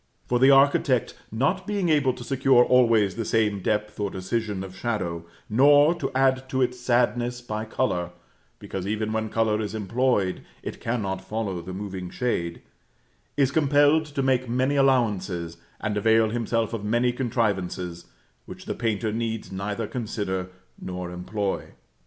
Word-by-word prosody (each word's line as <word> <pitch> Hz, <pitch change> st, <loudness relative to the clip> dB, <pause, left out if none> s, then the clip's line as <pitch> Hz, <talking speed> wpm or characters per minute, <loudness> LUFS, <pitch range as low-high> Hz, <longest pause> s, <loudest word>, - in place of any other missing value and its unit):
For 120 Hz, -, +1 dB
the 130 Hz, +2 st, +6 dB
architect, 135 Hz, -1 st, +4 dB, 0.2 s
not 140 Hz, -, 0 dB
being 200 Hz, -4 st, 0 dB
able 145 Hz, -4 st, +3 dB
to 120 Hz, -, -9 dB
secure 130 Hz, -1 st, +4 dB
always 115 Hz, -6 st, +4 dB
the 115 Hz, -, -2 dB
same 105 Hz, -3 st, +1 dB
depth 105 Hz, +2 st, -1 dB
or 100 Hz, -1 st, 0 dB
decision 100 Hz, +1 st, -3 dB
of 95 Hz, -1 st, -9 dB
shadow, 90 Hz, -6 st, -3 dB, 0.2 s
nor 145 Hz, +7 st, +5 dB
to 170 Hz, -, -3 dB
add 130 Hz, 0 st, +2 dB
to 130 Hz, -, -1 dB
its 125 Hz, 0 st, -2 dB
sadness 120 Hz, 0 st, +1 dB
by 110 Hz, -3 st, -4 dB
color 100 Hz, -7 st, -1 dB, 0.5 s
(because 95 Hz, 0 st, -6 dB
even 110 Hz, +1 st, -2 dB
when 110 Hz, 0 st, -1 dB
color 110 Hz, -1 st, +1 dB
is 105 Hz, 0 st, -4 dB
employed, 110 Hz, -2 st, 0 dB, 0.2 s
it -, -, -6 dB
cannot 100 Hz, -5 st, -2 dB
follow 100 Hz, -5 st, -3 dB
the 90 Hz, +3 st, -8 dB
moving 95 Hz, -2 st, -5 dB
shade), 85 Hz, -9 st, -2 dB, 0.7 s
is 135 Hz, -2 st, +3 dB
compelled 145 Hz, +1 st, +4 dB
to 145 Hz, -2 st, -3 dB
make 130 Hz, -2 st, +1 dB
many 130 Hz, +4 st, +1 dB
allowances, 105 Hz, -11 st, +1 dB, 0.2 s
and 105 Hz, -1 st, -2 dB
avail 110 Hz, +1 st, +3 dB
himself 115 Hz, -1 st, -1 dB
of 110 Hz, -3 st, -4 dB
many 120 Hz, +3 st, +1 dB
contrivances, 100 Hz, -8 st, -2 dB, 0.4 s
which -, -, -10 dB
the -, -, -2 dB
painter 110 Hz, -2 st, -1 dB
needs 115 Hz, -2 st, -3 dB
neither 100 Hz, +4 st, -3 dB
consider 105 Hz, -6 st, -3 dB, 0.3 s
nor 90 Hz, -1 st, -5 dB
employ. 95 Hz, +3 st, -3 dB
115 Hz, 150 wpm, -25 LUFS, 100-130 Hz, 0.7 s, the